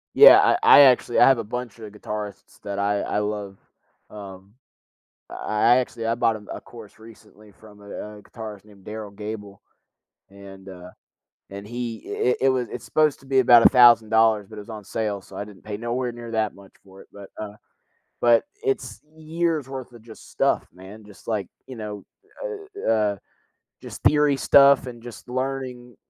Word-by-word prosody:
Yeah, - - +9
I - - +3
I - - +8
actually 125 -3 +4
I - - +7
have 135 -3 +4
a - - -3
bunch 120 0 -7
of 110 -2 -10
guitarists 105 -1 -8
that 100 -1 -5
I 100 0 0
I - - -2
love. 105 -2 -4 0.5
Um, 100 -1 -11 0.8
I 110 +3 +2
actually 120 -2 -2
I 115 - +1
bought, 115 -1 +1
um, 105 -1 -14
a - - -7
course 115 -4 -14
recently 110 -1 -17
from 105 +2 -18
a 100 0 -14 0.3
a - - -16
guitarist 105 -3 -10
named 100 -3 -19
Derryl 105 -1 -8
Gabel, 105 -1 -8 0.7
and, 100 -1 -13
uh 90 -1 -11 0.6
and 100 +1 -9
he 120 0 -6
i - - -6 0.2
i - - +1
it 135 - +4
was 130 -2 -1
it's - - -7
supposed 155 -2 +1
to - - -18
be 135 0 +2
about 120 -2 +6
$1,000, 110 -4 +5
but 110 - -12
it - - -6
was 105 - -12
on 110 -2 -8
sale, 105 -1 -3
so - - -15
I - - -4
didn't 105 -2 -16
pay 105 -1 -6
nowhere 120 +2 -3
near 120 -1 -9
that 110 -2 -1
much 100 -1 -17
for 95 0 -16
it, - - -18
but, 100 -1 -12
uh 105 -1 -7 0.7
but 120 -1 +4 0.2
it's 130 -4 -3 0.2
years 160 -2 -2
worth 130 -2 -7
of 120 - -14
just 110 -1 -15
stuff, - - 0
man, 95 +4 -13
just 105 -2 -17
like, 105 -5 -2 0.2
you 130 - -9
know, 105 -3 -7 0.4
uh, 405 -4 -6
uh, 105 -2 +1 0.6
just - - -10
theory 150 -2 +3
stuff, 140 -1 +5
and 120 -2 -10
just 120 0 -11
learning, 130 -2 -5
110 Hz, 185 wpm, -23 LUFS, 105-125 Hz, 0.8 s, Yeah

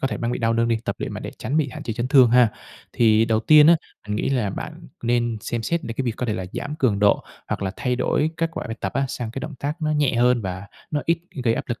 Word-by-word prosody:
có 135 - 0
thể - - -3
bang 120 +1 -2
bị - - -2
đau 115 -1 +1
lưng 115 0 +1
đi, 115 - +2
tập - - -2
luyện - - -4
mà - - -6
để - - -6
tránh 145 - -2
bị 150 -3 +2
hạn - - -8
chế 115 - -3
chấn 120 +3 -3
thương 130 -4 +6
ha. 125 -2 +6 0.4
Thì 110 -1 +4
đầu 110 -1 +1
tiên 150 +4 +7
á, 170 0 +7 0.3
mình 105 0 -2
nghĩ - - -1
là 120 -7 0
bạn - - -7
nên 120 -1 +1
xem 115 +1 -3
xét 170 +4 -1
đến 115 - -5
cái 135 - 0
việc 115 -2 -2
có 125 - -2
thể 110 - 0
là 95 - -4
giảm 145 +1 -4
cường 115 -10 +1
độ, 105 0 +3 0.2
hoặc - - -2
là 95 - -1
thay 125 -2 -1
đổi 155 +4 +1
kết 165 0 0
quả - - -5
bài 115 0 -5
tập - - -3
á, 135 0 +1
sang 120 -4 -4
cái 135 - -6
động 155 -2 -6
tác 150 +4 -4
nó 155 - +1
nhẹ 150 -4 +2
hơn 120 -1 +3
và 95 +1 -5 0.2
nó 150 - 0
ít 170 0 +2 0.3
gây 115 -1 +3
áp - - -3
lực 120 - -3
120 Hz, 305 wpm, -23 LUFS, 115-145 Hz, 0.4 s, tiên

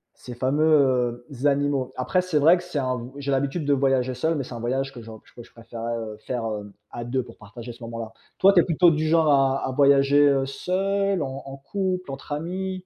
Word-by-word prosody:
ces 125 -1 -10
fameux, 130 -3 +2 0.2
heu, 145 - +3
animaux. 140 -2 0
Après, 180 +8 +1
c'est 180 -4 -1
vrai 165 +5 +6
que 180 - -8
c'est 175 -4 -6
un 125 -2 -3
j'ai 140 0 -3
l'habitude 140 +3 -1
de 145 - +3
voyager 130 -2 +1
seul, 160 +6 0
mais 140 - -2
c'est 125 - -10
un - - -6
voyage 135 +3 -2
que 120 - -9
je 110 0 -11 0.2
que 120 - -10
je - - -20
préférerais, 115 0 -6
heu, 110 -2 -6
faire, 120 -3 -2
heu, 105 -1 -6 0.2
à 120 - -6
2 125 +1 -2
pour - - -14
partager 115 +3 -10
ce 120 0 -14
moment-là. 115 -1 -6 0.3
Toi, 195 +1 +6
tu 180 - +6
es - - 0
plutôt 175 0 +4
du 155 0 -1
genre 160 -1 +3
à 135 -1 +2
à - - -3
voyager, 140 +1 +4
heu, 135 -1 +1
seul, 195 +5 -1
en 135 0 -6
en 135 0 -8
couple, 185 +2 -3
entre 135 +2 -9
amis? 180 +5 -3
135 Hz, 230 wpm, -24 LUFS, 125-155 Hz, 0.3 s, vrai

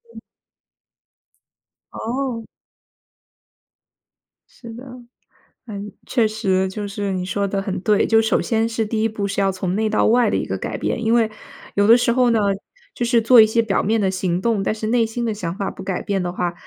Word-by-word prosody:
嗯。 - - -8 1.7
哦。 240 -1 -4 2.0
是 235 -2 -12
的。 245 +4 -10 0.8
呃， 215 - -8 0.3
确 235 -4 +1
实 190 -3 0
就 205 +1 -5
是 200 0 -3
你 185 -1 -2
说 200 +2 -1
得 195 0 -2
很 195 -2 -3
对。 210 0 +2
就 225 0 +4
首 220 - +1
先 225 0 0
是 225 -1 -1
第 215 0 -2
一 225 - +2
步 205 -2 -3
是 200 0 -1
要 195 0 +2
从 185 -1 -3
内 215 +1 0
到 215 - +2
外 240 +2 +4
的 - - 0
一 - - -2
个 - - -3
改 - - -4
变。 235 -2 -2
因 225 +1 +2
为， 230 -2 +3 0.5
有 205 0 +3
的 230 +2 +8
时 235 -1 +1
候 250 -1 +3
呢， 230 -2 +2 0.5
就 240 - -2
是 235 -1 +3
做 230 0 +7
一 - - +7
些 230 +1 +2
表 205 -4 0
面 220 +2 +1
的 195 -2 +1
行 185 -1 -1
动， 225 -3 +1
但 215 - 0
是 215 0 -4
内 235 0 +2
心 235 +2 -4
的 225 - -1
想 180 -4 -5
法 200 - -2
不 190 - -10
改 190 -2 -3
变 195 -2 -1
的 175 - -2
话， 175 -1 -2
215 Hz, 220 characters per minute, -21 LUFS, 195-230 Hz, 2.0 s, 的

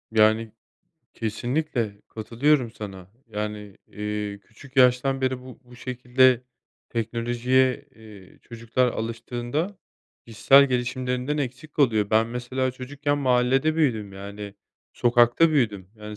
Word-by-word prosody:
Yani, 110 0 +3 0.6
kesinlikle 115 -1 -2
katılıyorum 120 +4 +1
sana. 95 -4 -9 0.2
Yani, 105 -2 -5
eee, 105 -1 -4
küçük 130 +6 -17
yaştan 130 +1 +4
beri 130 -1 -1
bu 130 -1 -12
bu 125 0 -16
şekilde 125 0 +2 0.5
teknolojiye, 120 +4 0
eee, 105 -4 -15
çocuklar 115 +2 -1
alıştığında 120 - -3 0.5
kişisel 135 +5 +5
gelişimlerinden 125 +2 -2
eksik 135 +2 -5
kalıyor. 110 -8 +2
Ben 110 +1 +4
mesela 125 +2 -2
çocukken 140 +3 -3
mahallede 130 +3 +2
büyüdüm, 110 -10 0
yani, 100 +1 -8 0.4
sokakta 120 +6 +4
büyüdüm. 110 -11 0
Yani, 105 0 -9
120 Hz, 110 wpm, -25 LUFS, 110-130 Hz, 0.6 s, kişisel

